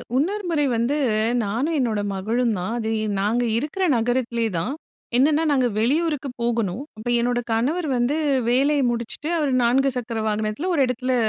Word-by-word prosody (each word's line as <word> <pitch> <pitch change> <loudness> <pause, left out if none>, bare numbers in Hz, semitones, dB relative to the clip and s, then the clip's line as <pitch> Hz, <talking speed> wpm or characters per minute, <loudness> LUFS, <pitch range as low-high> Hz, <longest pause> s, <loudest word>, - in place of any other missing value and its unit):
இன்னொரு 385 +10 0
முறை 300 -3 +1
வந்து, 240 +6 +1 0.5
நானும் 240 +11 -1
என்னோட 230 -5 0 0.2
மகளும் 230 +5 0
தான். 180 +5 -3
அது 220 -1 -2 0.3
நாங்க 220 +5 +1
இருக்கிற 300 +9 -2
நகரத்திலே 235 0 0
தான். 170 +11 -2 0.4
என்னனா, 300 +4 +3
நாங்க 260 -3 +3
வெளியூருக்கு 290 +5 0
போகணும். 230 -1 -1
அப்ப 215 - -8
என்னோட 240 +1 +1
கணவர் 290 +10 0
வந்து 245 +4 +1 0.3
வேலைய 280 +4 +3
முடிச்சிட்டு, 235 +6 -4
அவர் 295 -4 0
4 265 +3 +3
சக்கர 230 -2 -3
வாகனத்தில 215 - -1
1 305 - +2
இடத்தில 250 +1 -1
245 Hz, 150 wpm, -23 LUFS, 230-290 Hz, 0.5 s, என்னனா